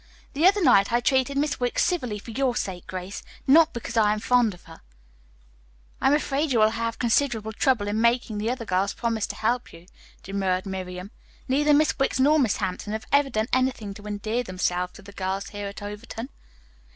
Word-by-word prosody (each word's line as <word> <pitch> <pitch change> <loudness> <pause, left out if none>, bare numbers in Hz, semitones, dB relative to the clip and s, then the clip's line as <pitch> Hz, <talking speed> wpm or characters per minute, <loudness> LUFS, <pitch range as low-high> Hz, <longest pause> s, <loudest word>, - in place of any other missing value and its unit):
The 310 +5 +4
other 400 0 +3
night 200 -6 +5
I 240 - +3
treated 265 +2 +1
Miss 290 +1 0
Wicks 245 -1 +1
civilly 250 - -1
for 220 +3 -10
your 255 +1 0
sake, 190 -7 -4
Grace, 185 +2 -6 0.2
not 320 +4 +6
because 235 -1 -6
I 210 -1 +4
am 215 - -3
fond 235 -3 +2
of 175 - -20
her." 165 - -14 1.2
"I - - +3
am 280 - +5
afraid 290 0 -1
you 245 - +2
will 215 0 +5
have 230 0 -3
considerable 230 -3 0
trouble 235 -3 +1
in 210 +2 0
making 235 -2 +1
the 215 +2 -1
other 245 -2 -3
girls 195 +1 0
promise 230 -3 -1
to 205 - -6
help 235 +4 -1
you," 165 +1 -14 0.4
demurred 190 -1 -1
Miriam. 185 0 -6 0.4
"Neither 295 +3 +3
Miss 305 0 +2
Wicks 270 -1 +1
nor 300 +4 +5
Miss 240 -7 +2
Hampton 195 +1 -3
have 220 - -4
ever 280 -1 +4
done 215 -3 0
anything 255 -5 0
to 205 +1 -11
endear 215 +3 -2
themselves 180 -3 -2
to - - -14
the 200 - -12
girls 195 +1 -3
here 205 -1 -5
at 200 +1 -8
Overton. 215 +4 -7
225 Hz, 200 wpm, -25 LUFS, 200-260 Hz, 1.2 s, not